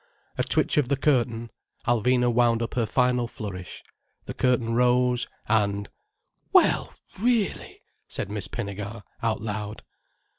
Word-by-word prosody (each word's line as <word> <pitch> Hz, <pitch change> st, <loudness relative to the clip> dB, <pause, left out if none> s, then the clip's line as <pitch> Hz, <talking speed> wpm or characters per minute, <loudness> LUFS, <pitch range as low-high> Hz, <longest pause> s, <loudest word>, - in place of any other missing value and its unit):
A -, -, 0 dB
twitch -, -, +1 dB
of 140 Hz, -4 st, +2 dB
the 140 Hz, -, +2 dB
curtain. 120 Hz, -5 st, +1 dB, 0.3 s
Alvina 120 Hz, +1 st, +2 dB
wound 120 Hz, -1 st, +3 dB
up 115 Hz, -, -4 dB
her 115 Hz, -3 st, 0 dB
final 125 Hz, -1 st, +2 dB
flourish, 95 Hz, -5 st, -7 dB, 0.4 s
the -, -, -5 dB
curtain 120 Hz, -3 st, +1 dB
rose, 125 Hz, 0 st, +3 dB, 0.2 s
and: 100 Hz, -2 st, +1 dB, 0.6 s
"Well -, -, +4 dB, 0.2 s
really!" 230 Hz, -1 st, 0 dB, 0.2 s
said 100 Hz, -, -5 dB
Miss 105 Hz, -1 st, -3 dB
Pinnegar, 105 Hz, -1 st, -5 dB, 0.2 s
out 115 Hz, -3 st, 0 dB
loud. 105 Hz, 0 st, -5 dB
115 Hz, 125 wpm, -26 LUFS, 105-125 Hz, 0.6 s, Well